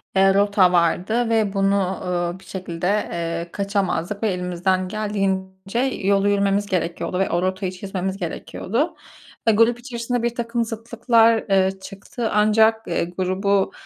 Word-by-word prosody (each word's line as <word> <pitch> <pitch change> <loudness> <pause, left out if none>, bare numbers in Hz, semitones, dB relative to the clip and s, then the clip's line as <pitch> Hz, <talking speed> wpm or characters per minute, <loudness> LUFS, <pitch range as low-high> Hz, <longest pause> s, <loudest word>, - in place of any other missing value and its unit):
eee, 195 0 +5
rota 200 -2 +4
vardı 185 +7 +1
ve 220 -3 +1
bunu, 195 0 +2 0.3
ııı, 175 0 -2
bir - - -18
şekilde, 180 -2 -4 0.2
eee, 170 0 -3
kaçamazdık 200 0 -2
ve 220 - +2
elimizden 180 +1 -1
geldiğince 195 0 -2
yolu 200 -6 +1
yürümemiz 200 0 +1
gerekiyordu 180 -1 -2
ve 195 - +1
o 175 - 0
rotayı 185 0 -1
çizmemiz 190 0 -4
gerekiyordu. 230 - -3 0.5
Eee, 225 - +6
grup 230 +3 +3
içerisinde 240 -1 -3
birtakım 235 0 -1
zıtlıklar, 230 0 +2
ııı, 190 0 +2
çıktı 200 +4 -5
ancak, 220 +1 +3
eee, - - 0
grubu, 190 +3 0
195 Hz, 135 wpm, -22 LUFS, 185-220 Hz, 0.5 s, Eee